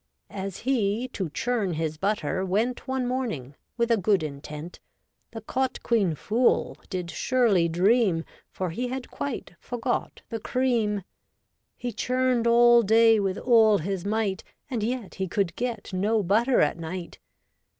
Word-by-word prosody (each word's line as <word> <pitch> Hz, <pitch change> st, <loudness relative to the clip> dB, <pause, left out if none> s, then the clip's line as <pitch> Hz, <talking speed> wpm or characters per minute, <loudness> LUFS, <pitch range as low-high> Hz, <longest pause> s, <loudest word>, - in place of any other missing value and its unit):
As 195 Hz, -2 st, -5 dB
he 235 Hz, -1 st, 0 dB
to 190 Hz, -8 st, -4 dB
churn 215 Hz, +1 st, -1 dB
his 155 Hz, -1 st, -2 dB
butter 195 Hz, -1 st, 0 dB
went 220 Hz, +9 st, -1 dB
One 260 Hz, -1 st, -1 dB
morning, 225 Hz, -, -3 dB, 0.2 s
with 235 Hz, 0 st, +1 dB
a 230 Hz, -, +5 dB
good 195 Hz, -3 st, +2 dB
intent. 150 Hz, +3 st, -7 dB, 0.5 s
The 225 Hz, -, -8 dB
cot 260 Hz, +4 st, -2 dB
quean 200 Hz, -9 st, +2 dB
fool 230 Hz, -, +1 dB
did 180 Hz, -3 st, -4 dB
surely 220 Hz, -10 st, +2 dB
dream, 185 Hz, 0 st, +2 dB, 0.2 s
For 185 Hz, -3 st, -3 dB
he 245 Hz, +9 st, -2 dB
had 255 Hz, +1 st, -5 dB
quite 270 Hz, -9 st, -5 dB
forgot 245 Hz, +1 st, -3 dB
the 225 Hz, -, -4 dB
cream. 225 Hz, -5 st, 0 dB, 0.7 s
He 245 Hz, -, -4 dB
churned 255 Hz, 0 st, +1 dB
all 240 Hz, 0 st, +6 dB
day 225 Hz, +1 st, +5 dB
with 195 Hz, -1 st, -1 dB
all 225 Hz, -4 st, +5 dB
his 185 Hz, +1 st, -3 dB
might, 205 Hz, -2 st, -1 dB, 0.3 s
And 235 Hz, -4 st, -1 dB
yet 235 Hz, -1 st, -3 dB
he 190 Hz, -1 st, -3 dB
could 185 Hz, -1 st, -1 dB
get 235 Hz, -5 st, -4 dB
no 210 Hz, +3 st, +1 dB
butter 225 Hz, +8 st, +3 dB
at 150 Hz, +3 st, +1 dB
night. 170 Hz, +1 st, -6 dB
215 Hz, 150 wpm, -26 LUFS, 185-240 Hz, 0.7 s, all